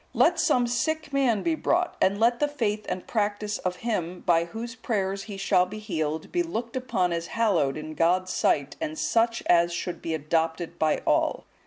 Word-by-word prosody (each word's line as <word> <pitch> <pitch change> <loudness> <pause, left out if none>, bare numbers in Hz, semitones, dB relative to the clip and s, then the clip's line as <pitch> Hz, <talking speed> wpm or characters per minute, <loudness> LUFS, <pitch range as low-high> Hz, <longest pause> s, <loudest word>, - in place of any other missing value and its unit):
Let 340 0 +4
some 250 -6 +3
sick 280 +6 -1
man 255 -6 +2
be 335 - +1
brought, 350 +3 0
and 200 +2 +3
let 235 +1 +3
the 295 - +2
faith 215 -8 -2
and 185 - -3
practice 210 -1 -1
of 185 -1 -2
him, 180 -6 -2
by 170 -2 +3
whose 225 +6 -6
prayers 200 -5 -2
he 200 - -6
shall 185 -2 +3
be 210 +4 -7
healed, 160 -7 -3
be 350 - +1
looked 245 -9 -4
upon 190 -9 0
as 170 0 -3
hallowed 170 -11 +1
in 155 0 -6
God's 180 +4 +1
sight 140 0 +1
and 155 +1 -3
such 230 0 +1
as 170 0 +4
should 175 +1 -4
be 165 -1 -2
adopted 165 +2 -1
by 155 -1 +1
all." - - +1
200 Hz, 190 wpm, -26 LUFS, 170-235 Hz, -, Let